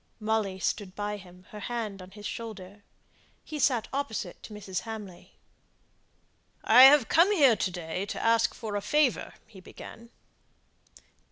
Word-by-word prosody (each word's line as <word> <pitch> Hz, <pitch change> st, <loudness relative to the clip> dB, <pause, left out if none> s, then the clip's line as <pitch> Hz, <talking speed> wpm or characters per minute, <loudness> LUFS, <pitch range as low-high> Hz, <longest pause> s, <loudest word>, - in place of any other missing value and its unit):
Molly 215 Hz, -3 st, -1 dB
stood 190 Hz, +1 st, -3 dB
by 210 Hz, 0 st, -3 dB
him, 185 Hz, -1 st, -15 dB
her 210 Hz, -, -8 dB
hand 215 Hz, -4 st, -4 dB
on 185 Hz, -, -11 dB
his 205 Hz, +2 st, -12 dB
shoulder. 205 Hz, -4 st, -7 dB, 0.6 s
He 305 Hz, -, -6 dB
sate 250 Hz, -5 st, +2 dB
opposite 280 Hz, -5 st, -4 dB
to -, -, -11 dB
Mrs. 195 Hz, -3 st, -5 dB
Hamley. 210 Hz, -5 st, -9 dB, 1.3 s
"I've 260 Hz, +3 st, +8 dB
come 340 Hz, +5 st, +4 dB
here 280 Hz, -, +5 dB
to -, -, 0 dB
day 175 Hz, +2 st, -5 dB
to -, -, -5 dB
ask 230 Hz, 0 st, +2 dB
a 205 Hz, -2 st, -2 dB
favour," 295 Hz, +2 st, +1 dB
he 195 Hz, -, -15 dB
began. 230 Hz, +5 st, -12 dB
215 Hz, 140 wpm, -28 LUFS, 195-235 Hz, 1.3 s, I've